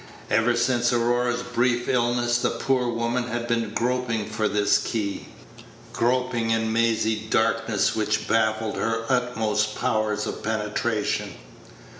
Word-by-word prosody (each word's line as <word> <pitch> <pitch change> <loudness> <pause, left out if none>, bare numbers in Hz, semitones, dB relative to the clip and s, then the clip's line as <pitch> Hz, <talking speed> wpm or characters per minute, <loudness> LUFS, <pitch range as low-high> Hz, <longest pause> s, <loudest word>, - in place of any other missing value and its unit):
Ever 115 +3 +3
since 120 0 +2
Aurora's 120 +1 +1
brief 120 0 0
illness 120 -1 +1
the - - +1
poor 125 +1 0
woman 120 +1 -1
had 120 0 -3
been 115 -2 0
groping 120 -2 -1
for 110 0 -1
this 105 0 +2
key 105 -4 -3 0.7
groping 125 -1 0
in 110 0 +1
mazy 110 -1 +1
darknesses - - +1
which 110 0 -1
baffled 110 -1 +1
her 115 0 -1
utmost 110 -4 0
powers 105 -1 0
of - - -5
penetration. 105 - -2
115 Hz, 125 wpm, -24 LUFS, 110-120 Hz, 0.7 s, Ever